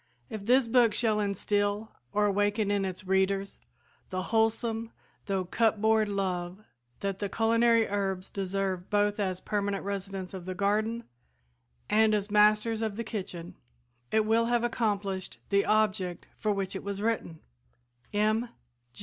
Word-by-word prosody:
If 215 Hz, -1 st, -6 dB
this 255 Hz, 0 st, +5 dB
book 230 Hz, -2 st, +4 dB
shall 220 Hz, -2 st, +2 dB
instill 205 Hz, +1 st, 0 dB, 0.2 s
or 210 Hz, 0 st, +2 dB
awaken 205 Hz, +1 st, +1 dB
in 200 Hz, -1 st, +1 dB
its 185 Hz, 0 st, -5 dB
readers 190 Hz, +1 st, 0 dB, 0.5 s
the 185 Hz, -1 st, -2 dB
wholesome 225 Hz, 0 st, +1 dB, 0.4 s
though 190 Hz, -2 st, 0 dB
"cupboard" 220 Hz, +1 st, +2 dB
love 185 Hz, -1 st, -2 dB, 0.4 s
that 195 Hz, -1 st, -2 dB
the 205 Hz, -, -2 dB
culinary 230 Hz, +1 st, +3 dB
herbs 195 Hz, -2 st, -2 dB
deserve 195 Hz, -1 st, -2 dB
both 205 Hz, 0 st, +1 dB
as 185 Hz, -3 st, -1 dB
permanent 200 Hz, -1 st, -2 dB
residents 195 Hz, -1 st, -4 dB
of 185 Hz, -2 st, -7 dB
the 185 Hz, 0 st, -4 dB
garden 215 Hz, +4 st, 0 dB, 0.8 s
and 215 Hz, 0 st, +4 dB
as 205 Hz, 0 st, -2 dB
masters 210 Hz, +2 st, +4 dB
of 220 Hz, -2 st, -2 dB
the 230 Hz, -, -3 dB
kitchen, 185 Hz, -5 st, -6 dB, 0.6 s
it 220 Hz, -1 st, +3 dB
will 225 Hz, +1 st, +3 dB
have 240 Hz, 0 st, +1 dB
accomplished 200 Hz, -5 st, -1 dB
the 200 Hz, 0 st, +2 dB
object 190 Hz, -5 st, +1 dB
for 215 Hz, -, -1 dB
which 195 Hz, -2 st, -2 dB
it -, -, -5 dB
was 200 Hz, -1 st, -4 dB
written. 210 Hz, -7 st, -2 dB, 0.7 s
M. 215 Hz, +3 st, +1 dB
205 Hz, 140 wpm, -29 LUFS, 195-220 Hz, 0.8 s, this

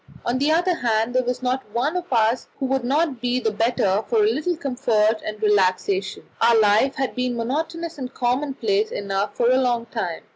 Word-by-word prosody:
On 245 Hz, +2 st, 0 dB
the 290 Hz, +3 st, +2 dB
other 350 Hz, +3 st, +2 dB
hand, 225 Hz, 0 st, 0 dB
there 255 Hz, -, +3 dB
was 250 Hz, +1 st, -3 dB
not 255 Hz, +1 st, 0 dB
one 275 Hz, +8 st, 0 dB
of 355 Hz, -3 st, -4 dB
us 230 Hz, 0 st, +2 dB
who 270 Hz, -, -2 dB
would 265 Hz, -1 st, 0 dB
not 275 Hz, 0 st, 0 dB
be 245 Hz, 0 st, 0 dB
the 220 Hz, -3 st, 0 dB
better 215 Hz, -2 st, +1 dB
for 445 Hz, -3 st, +2 dB
a -, -, +4 dB
little 345 Hz, 0 st, -1 dB
comfort 235 Hz, -7 st, +1 dB
and 215 Hz, 0 st, -5 dB
relaxation; 195 Hz, -1 st, +1 dB, 0.2 s
our 230 Hz, -1 st, +5 dB
life 215 Hz, +6 st, +3 dB
had 270 Hz, -1 st, -2 dB
been 250 Hz, -1 st, -2 dB
monotonous 320 Hz, +7 st, -3 dB
and 255 Hz, -1 st, -5 dB
commonplace 290 Hz, -, 0 dB
enough 200 Hz, -, -3 dB
for 240 Hz, +1 st, +2 dB
a 255 Hz, -, +4 dB
long 240 Hz, -2 st, 0 dB
time. 220 Hz, -8 st, -4 dB
245 Hz, 195 wpm, -22 LUFS, 220-275 Hz, 0.2 s, our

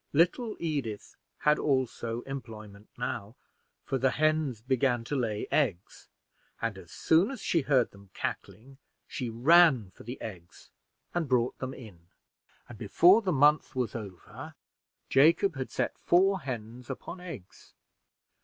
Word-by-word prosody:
Little 180 Hz, -, +2 dB
Edith 140 Hz, -11 st, -4 dB, 0.3 s
had 150 Hz, 0 st, +3 dB
also 120 Hz, -4 st, -1 dB
employment 110 Hz, -6 st, -9 dB
now, 120 Hz, -2 st, -4 dB, 0.5 s
for 135 Hz, -, -2 dB
the 130 Hz, +2 st, +3 dB
hens 155 Hz, -5 st, 0 dB
began 125 Hz, 0 st, 0 dB
to 145 Hz, -, -4 dB
lay 110 Hz, -5 st, -1 dB
eggs, 105 Hz, -, -1 dB, 0.5 s
and 115 Hz, -3 st, -2 dB
as 85 Hz, -3 st, -14 dB
soon 165 Hz, +6 st, +3 dB
as 270 Hz, -3 st, -6 dB
she 165 Hz, -, +1 dB
heard 135 Hz, -3 st, +2 dB
them 100 Hz, -1 st, -17 dB
cackling, 120 Hz, +8 st, -6 dB, 0.3 s
she 125 Hz, -3 st, -4 dB
ran 130 Hz, -, +5 dB
for -, -, -17 dB
the 120 Hz, +4 st, -8 dB
eggs 90 Hz, -5 st, -10 dB, 0.4 s
and 170 Hz, -5 st, -1 dB
brought 125 Hz, -1 st, +1 dB
them 130 Hz, 0 st, -5 dB
in; 95 Hz, -9 st, -13 dB, 0.6 s
and 115 Hz, -3 st, -12 dB
before 175 Hz, -, +5 dB
the 190 Hz, -4 st, -1 dB
month 150 Hz, 0 st, +3 dB
was 125 Hz, -4 st, -1 dB
over, 100 Hz, -6 st, -9 dB, 0.5 s
Jacob 165 Hz, +6 st, +4 dB
had 130 Hz, -1 st, -4 dB
set -, -, -3 dB
four 190 Hz, +2 st, +3 dB
hens 120 Hz, -2 st, -7 dB
upon 135 Hz, +7 st, -7 dB
eggs. 105 Hz, -, -11 dB
130 Hz, 140 wpm, -29 LUFS, 110-155 Hz, 0.6 s, ran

